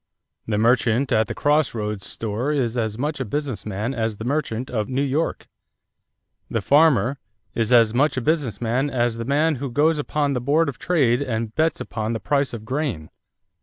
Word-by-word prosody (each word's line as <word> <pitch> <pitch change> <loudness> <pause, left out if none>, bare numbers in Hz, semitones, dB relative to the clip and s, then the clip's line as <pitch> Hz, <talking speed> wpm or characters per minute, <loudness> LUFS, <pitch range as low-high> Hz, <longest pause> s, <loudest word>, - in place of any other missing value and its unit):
The 105 -2 0
merchant 120 +3 +2
at 110 0 +3
the - - -5
cross 150 -2 +2
roads 105 -3 -4
store 115 +6 -3
is 125 -6 0
as 110 -3 -1
much 145 +3 -2
a - - 0
business 130 -2 -4
man 105 +5 -2
as 110 -3 -2
the 110 - -6
merchant 130 -3 -2
of 110 -4 -2
New 135 +2 0
York. 145 +4 -1 1.0
The 115 - -1
farmer... 140 +1 +3 0.3
is 115 0 -1
as 115 -3 +5
much 140 +3 +2
a - - 0
business 135 - 0
man 125 +5 0
as 120 -3 0
the 115 - -4
man 150 +3 +2
who 135 +2 -4
goes 150 +5 +2
upon 145 -1 0
the 125 - -2
board 150 +5 +2
of 135 - -8
trade 140 -8 +2
and 115 -4 -3
bets 160 +4 +1
upon 110 -2 -3
the 115 - -2
price 140 +1 0
of 110 -2 -7
grain. 125 - -3
125 Hz, 195 wpm, -23 LUFS, 115-145 Hz, 1.0 s, as